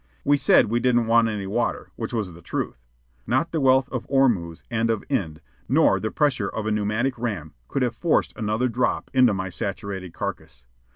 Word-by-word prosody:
We 145 - +4
said 135 -2 +5
we 115 +3 0
didn't 120 -1 +2
want 115 0 +4
any 105 -3 -3
water 95 - -2
which - - -4
was 105 -7 -2
the 85 - -13
truth. - - -4 0.5
Not 165 +1 +1
the 160 - -1
wealth 130 0 +4
of 125 -3 -4
Ormuz 105 - +1
and 115 0 +1
of 110 -2 0
Ind, 85 - -2 0.3
nor - - +4
the 110 - -2
pressure 130 -9 +1
of 110 - -4
a 110 - 0
pneumatic 110 +5 0
ram, 100 -10 -4
could 135 - -1
have 120 -2 0
forced 160 +6 +1
another 110 +2 0
drop 125 +1 -1
into 125 -5 +5
my 95 0 -3
saturated 95 -1 -4
carcass. 80 -9 -6
110 Hz, 190 wpm, -24 LUFS, 95-125 Hz, 0.5 s, said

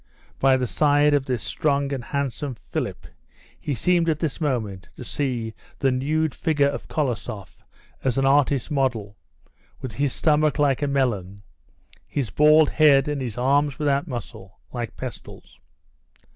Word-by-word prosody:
By 135 -1 +4
the 130 - -1
side 145 +3 +3
of 140 -2 +1
this 125 -3 -1
strong 140 -2 0
and 130 -3 -4
handsome 140 0 -3
Philip 95 - -5 0.5
he 145 - -3
seemed 170 +5 +2
at 155 - +1
this 160 +1 -3
minute 110 -10 -2
to - - -8
see 120 -4 -2 0.2
the 135 - +2
nude 150 +4 0
figure 145 -4 +1
of - - -6
Kolosoff 120 - -4 0.4
as 130 -2 0
an 135 - +2
artist's 140 0 +2
model; 120 -8 -1 0.6
with 130 - -6
his 140 +5 -1
stomach 155 +1 +2
like 145 -3 +2
a 145 - +1
melon, 105 -8 -1 0.7
his 130 -8 -2
bald 150 +3 +5
head, 145 -3 +5
and 145 -2 -2
his 120 -5 -5
arms 140 +1 +2
without 145 +1 0
muscle, 105 -6 -8 0.2
like 120 -2 -5
pestles. 120 - -9
135 Hz, 150 wpm, -24 LUFS, 120-145 Hz, 0.7 s, bald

